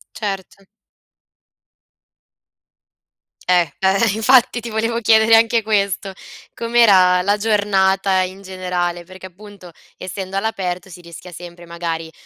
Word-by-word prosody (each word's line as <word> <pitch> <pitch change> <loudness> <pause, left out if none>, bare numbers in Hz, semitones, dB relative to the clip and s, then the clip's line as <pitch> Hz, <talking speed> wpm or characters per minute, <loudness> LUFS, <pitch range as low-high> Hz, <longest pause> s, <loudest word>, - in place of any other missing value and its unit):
Certo. 195 -2 -6 2.8
Eh, 180 -1 +5 0.2
eh, 195 +3 +2
infatti 240 +2 +3
ti 235 - -8
volevo 230 +1 -2
chiedere 220 0 +3
anche 230 0 +2
questo, 200 -2 -1 0.4
com'era 200 -6 +3
la 205 +3 0
giornata 195 -3 +1
in 190 +2 -8
generale? 180 -2 -4
Perché 185 +1 -12
appunto, 195 -1 -15 0.2
essendo 190 +1 -7
all'aperto, 190 -4 -3
si 175 -1 -12
rischia 170 +1 -12
sempre 175 0 -12
magari, 165 -1 -5
195 Hz, 110 wpm, -18 LUFS, 180-215 Hz, 2.8 s, Eh